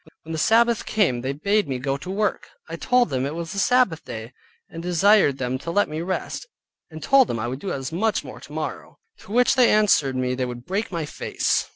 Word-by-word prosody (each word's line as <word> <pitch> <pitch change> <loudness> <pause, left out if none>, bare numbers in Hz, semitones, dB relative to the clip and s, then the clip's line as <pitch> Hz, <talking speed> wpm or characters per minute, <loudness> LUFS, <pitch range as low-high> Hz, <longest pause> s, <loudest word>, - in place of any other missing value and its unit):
When 160 - -9
the 160 - -2
Sabbath 230 +5 +3
came 170 - +1
they 130 +2 -2
bade 200 +9 0
me 130 -2 -2
go 135 +2 -2
to 140 +6 -8
work. 205 +2 -1 0.2
I - - -5
told 250 - +2
them 130 -1 -1
it 140 +3 -3
was 170 +2 -5
the 200 - -3
Sabbath 225 -8 +2
day, 110 +3 -8 0.3
and 165 - -8
desired 180 -3 +4
them 130 0 -2
to 170 - -7
let 205 +4 +2
me 155 +1 -4
rest, 185 +2 -4 0.4
and 160 -2 -9
told 270 +5 +5
them 115 - -3
I 115 +1 -3
would 130 +2 -4
do 195 - -4
as 135 +1 -4
much 210 +6 0
more - - -10
tomorrow; - - -6 0.2
to - - -14
which 245 +2 +4
they 255 -3 +5
answered 195 -11 +3
me 125 0 -1
they 130 0 -1
would 120 0 -8
break 200 +4 -2
my 165 -3 -2
face. - - -1
165 Hz, 230 wpm, -23 LUFS, 135-210 Hz, 0.4 s, told